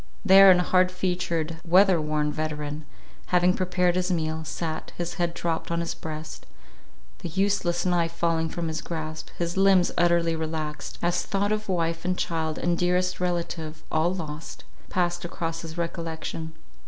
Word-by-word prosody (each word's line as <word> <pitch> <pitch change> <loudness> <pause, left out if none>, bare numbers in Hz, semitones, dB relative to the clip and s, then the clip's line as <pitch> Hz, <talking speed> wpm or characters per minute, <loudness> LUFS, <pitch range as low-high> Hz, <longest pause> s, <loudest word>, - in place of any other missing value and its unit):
There 195 0 +9
an 185 - +8
hard 185 +1 +3
featured, 175 -3 -1
weather 185 0 +5
worn 150 -1 0
veteran, 150 -1 -4 0.4
having 180 0 +4
prepared 180 -1 +1
his 180 0 0
meal, 160 -2 -1
sat, 160 0 -4
his 175 0 -3
head 170 0 0
dropped 165 -1 -2
on 170 0 0
his 170 0 -2
breast, 155 0 -7 0.7
the 175 - -5
useless 185 -1 0
knife 175 -2 +2
falling 165 -1 0
from 170 0 -3
his 160 0 -3
grasp, 160 -1 -5
his 170 +1 -2
limbs 190 -2 +5
utterly 170 -1 +3
relaxed, 155 -1 -4
as 175 0 +2
thought 200 +1 0
of 215 -1 -2
wife 165 -2 0
and 180 0 0
child, 160 -2 -1
and 175 0 0
dearest 180 +1 +1
relative, 170 -3 -3
all 160 +2 +2
lost, 160 -4 -6 0.3
passed 175 -1 0
across 165 -1 -4
his 165 0 -8
recollection. 165 -1 -4
170 Hz, 155 wpm, -26 LUFS, 160-180 Hz, 0.7 s, There